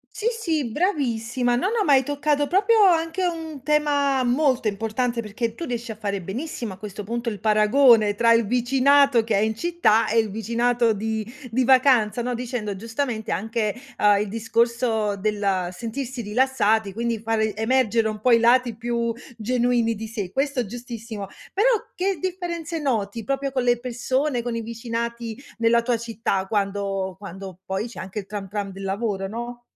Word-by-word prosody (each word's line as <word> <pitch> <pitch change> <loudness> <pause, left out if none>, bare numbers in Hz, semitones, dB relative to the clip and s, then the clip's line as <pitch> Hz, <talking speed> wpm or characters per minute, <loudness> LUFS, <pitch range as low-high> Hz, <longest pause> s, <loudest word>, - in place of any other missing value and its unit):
Sì, 430 +1 -4
sì 325 -10 -1
bravissima! 245 - 0
No, 255 +11 +1
no 445 -2 +1
ma 290 - +4
hai 265 - +6
toccato 290 +1 0
proprio 415 +4 +4
anche 330 +3 -1
un 320 -5 -4
tema 285 -2 +2
molto 255 -1 +2
importante, 225 +3 -1
perché 220 +2 -3
tu 340 - -6
riesci 240 -2 -4
a - - -8
fare 200 -2 -3
benissimo, 230 - -5
a 185 - -11
questo 210 0 -7
punto, 235 +2 -3
il 210 - -3
paragone 215 +1 +4
tra 230 +1 +4
il 230 -1 +4
vicinato 255 +2 +4
che 220 -2 0
è - - +3
in 220 +2 +1
città 340 -6 +2
e 230 - +2
il 220 -1 +2
vicinato 235 +2 +1
di 220 +1 -2 0.3
di 255 +3 +2
vacanza, 250 -3 +4
no, 250 0 -2
dicendo 235 -4 -3
giustamente 225 +1 -3
anche, 220 0 -1 0.3
uhm, 205 -1 +5
il 210 - -4
discorso 230 -1 0
del 200 -3 0
sentirsi 235 +5 -5
rilassati 220 -2 +1
quindi 230 0 -2
fare 220 -2 0
emergere 225 -1 +2
un 215 -1 -5
po' 250 +1 +3
i 230 - +6
lati 240 0 +4
più 235 0 -2 0.2
genuini 240 0 +1
di 220 +1 -6
sé. 205 -5 -5
Questo 275 0 -1
è - - -1
giustissimo. 230 -2 -7 0.3
Però 425 +6 +3 0.3
che 380 0 -1
differenze 345 -3 -3
noti, 230 -5 -1
proprio 275 +2 -2
con 255 -2 0
le 240 -1 +2
persone, 255 +2 -1
con 235 -1 -3
i - - -2
vicinati 230 0 -4 0.2
nella 235 0 +3
tua 240 0 +1
città, 225 -4 -2
quando 195 -2 -1
quando 190 -2 -9
poi 190 +4 -2
c'è 240 - -9
anche 190 +2 -6
il 195 - -12
Tram 200 -1 -6
Tram 200 -1 -4
del 195 +1 -9
lavoro, 195 -1 -2
no? 240 +2 -6
235 Hz, 175 wpm, -23 LUFS, 215-260 Hz, 0.3 s, hai